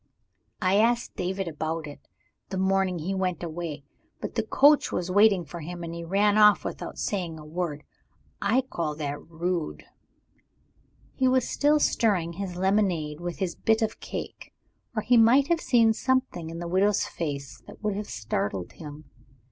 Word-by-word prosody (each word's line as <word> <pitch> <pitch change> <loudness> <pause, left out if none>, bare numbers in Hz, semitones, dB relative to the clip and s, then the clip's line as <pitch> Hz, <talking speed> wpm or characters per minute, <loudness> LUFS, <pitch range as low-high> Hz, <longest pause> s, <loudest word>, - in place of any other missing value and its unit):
I 185 +2 +3
asked 235 +2 +2
David 190 +1 -2
about 160 0 -3
it, 145 -1 -11 0.4
the 190 - -4
morning 190 -1 +1
he 170 +4 -3
went 185 -2 -1
away. 160 -3 -5 0.4
But - - -5
the - - +1
coach 290 +1 +4
was 180 +1 -2
waiting 200 -2 +5
for 160 +4 -8
him; 175 +2 -7
and 165 0 -5
he 170 0 -6
ran 205 +4 +2
off 210 -1 +6
without - - -5
saying 175 -5 -2
a 155 - -11
word. 155 -2 -4 0.6
I 220 +6 +3
call 170 - -3
that 145 -1 -4
rude." 170 0 -3 1.3
He 260 - +1
was 255 -1 +2
still 295 +1 +3
stirring 190 - +1
his 185 0 -5
lemonade 180 -5 +1
with 175 0 -5
his 185 -3 -2
bit 220 0 +1
of 220 0 -2
cake - - -7 0.4
or 215 - -1
he 245 0 +4
might 245 +5 +5
have 340 -1 +2
seen 230 -3 +4
something 260 -9 -1
in 165 - -7
the 170 0 -5
widow's 195 +3 +2
face 140 -6 -5
that - - -13
would 210 -2 0
have 210 +1 -5
startled 100 -5 -3
him. 150 -1 -10
180 Hz, 170 wpm, -26 LUFS, 165-210 Hz, 1.3 s, off